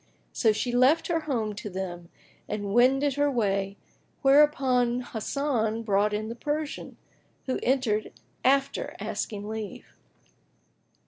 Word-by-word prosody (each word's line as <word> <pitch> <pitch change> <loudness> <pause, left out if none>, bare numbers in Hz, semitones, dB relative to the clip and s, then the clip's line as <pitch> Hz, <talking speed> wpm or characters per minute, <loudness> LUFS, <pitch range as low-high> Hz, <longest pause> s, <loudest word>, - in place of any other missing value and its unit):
So 225 - +3
she 215 +4 -1
left 260 +7 +4
her 335 -1 +2
home 235 -9 -2
to 210 +1 -6
them 175 -2 -6 0.4
and 205 -1 -3
wended 270 +4 +4
her 290 0 +3
way, 200 -5 0 0.5
whereupon 270 -4 +4
Hasan 230 -2 -1
brought 205 -1 +2
in 210 +1 -2
the 230 - -4
Persian, 295 +4 -4 0.5
who 260 - -1
entered 245 -5 +1 0.3
after 275 +1 +1
asking 205 -2 -4
leave. 215 -3 -6
240 Hz, 120 wpm, -27 LUFS, 210-270 Hz, 0.5 s, left